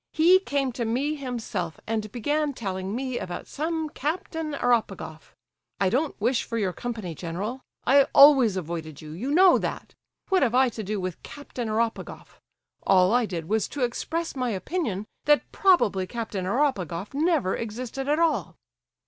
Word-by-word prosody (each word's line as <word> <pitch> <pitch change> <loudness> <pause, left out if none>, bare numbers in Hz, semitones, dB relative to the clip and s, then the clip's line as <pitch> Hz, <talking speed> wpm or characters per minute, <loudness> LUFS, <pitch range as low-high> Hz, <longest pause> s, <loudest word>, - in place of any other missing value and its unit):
He 350 +4 +6
came 280 -7 -1
to 240 0 -3
me 255 +7 0
himself 235 - -4
and 215 -2 -2
began 290 +5 -1
telling 190 -2 -4
me 255 -1 -2
about 175 -1 -6
some 320 +1 -2
Captain 315 0 -3
Eropegoff. 215 - -1 0.4
I 190 -2 +2
don't 285 +6 0
wish 235 +4 +1
for 230 - -4
your 195 -5 0
company, 220 -7 -5
general. 190 - -5 0.2
I 275 +1 +6
always 270 -8 +7
avoided 160 -3 -5
you—you 160 - -6
know 360 +5 +6
that. - - -5 0.4
What 380 -2 +3
have 245 -3 +2
I 260 0 +5
to 225 - -6
do 210 0 -3
with 185 -2 -5
Captain 260 -4 -7
Eropegoff? 225 +1 -3 0.4
All 185 +1 +4
I 245 -2 +3
did 170 -4 -5
was 220 +2 +1
to 285 - -3
express 325 +8 -2
my 255 -2 -1
opinion 215 - -2 0.2
that 295 0 +3
probably 215 - +3
Captain 215 -3 -4
Eropegoff 200 - -1
never 295 - +1
existed 245 +4 -5
at 300 - +3
all!" 330 -1 +1
240 Hz, 155 wpm, -26 LUFS, 195-290 Hz, 0.4 s, always